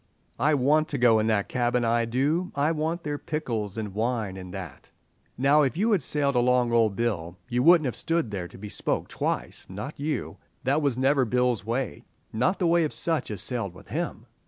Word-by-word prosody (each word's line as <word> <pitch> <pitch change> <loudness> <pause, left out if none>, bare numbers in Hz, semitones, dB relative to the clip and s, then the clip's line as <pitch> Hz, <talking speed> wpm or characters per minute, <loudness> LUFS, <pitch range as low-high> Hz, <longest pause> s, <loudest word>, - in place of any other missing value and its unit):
"I 150 +4 +3
want 150 +4 +3
to 145 - -3
go 120 -3 +5
in 110 - +1
that 105 -3 +1
cabin, 120 -1 0
I 115 0 +2
do; 145 +10 0
I 145 +3 +2
want 165 +2 -2
their 145 -1 -3
pickles 115 -10 -3
and 105 -3 -4
wine 110 -2 -1
and 90 -1 -8
that." 90 -7 -8 0.5
"Now, 140 +4 +4
if 140 +2 0
you 220 +5 +2
had 200 -6 +3
sailed 140 +1 +1
along 125 0 +3
o' 115 -2 +4
Bill 95 -5 -2
you 125 0 +1
wouldn't 165 +1 +6
have 125 - -2
stood 165 -9 -1
there 95 -3 -4
to - - -14
be 105 +2 -8
spoke - - -2
twice—not 105 +12 -4
you. 150 +1 -3 0.3
That 140 +4 +2
was 140 -5 0
never 135 +1 +3
Bill's 125 -3 +1
way, 115 - -3 0.3
not 130 - +1
the 180 - 0
way 170 0 +4
of 155 - -2
sich 165 -5 -1
as 105 - -4
sailed 115 -8 -3
with - - -15
him." - - -3
125 Hz, 205 wpm, -26 LUFS, 110-150 Hz, 0.5 s, wouldn't